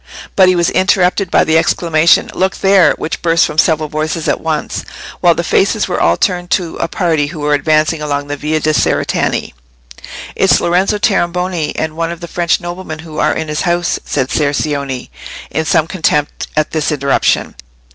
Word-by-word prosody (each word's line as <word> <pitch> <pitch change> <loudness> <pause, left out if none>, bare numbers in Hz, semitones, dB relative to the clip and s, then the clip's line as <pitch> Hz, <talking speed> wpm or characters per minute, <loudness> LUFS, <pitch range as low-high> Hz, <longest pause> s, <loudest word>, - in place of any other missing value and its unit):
But 190 -1 +5
he 185 - +4
was 170 -1 +1
interrupted 185 0 +2
by - - +3
the 160 0 +3
exclamation, 165 0 +2
"Look 190 +1 -1
there!" 195 -2 +4
which 160 - -4
burst 165 -1 +3
from 155 - -2
several 155 -1 +2
voices 155 +2 -3
at - - 0
once, 155 -2 -3 0.4
while - - +4
the - - -2
faces - - +1
were - - -2
all 85 +1 +3
turned 175 -1 -1
to 175 -3 -7
a - - -1
party 165 -7 0
who 155 0 -8
were 150 0 +1
advancing 155 +1 +1
along 145 -1 -2
the 145 0 -4
Via 155 +2 -1
de' 155 0 0
Cerretani. - - 0 0.8
"It's - - +3
Lorenzo 185 +4 +1
Tornabuoni, 180 -4 0
and 160 0 -3
one 165 0 -2
of 170 - -7
the 170 - -7
French 170 0 0
noblemen 175 -2 -6
who 160 -1 -8
are - - +1
in 160 - -3
his 150 0 -2
house," 175 -1 0
said 135 -2 -2
Ser 145 -2 +1
Cioni, 140 -3 -3 0.4
in 160 - -1
some 155 - +2
contempt 160 -4 -1
at 155 0 +1
this 155 -1 -1
interruption. 140 -2 0
160 Hz, 185 wpm, -14 LUFS, 150-175 Hz, 0.8 s, But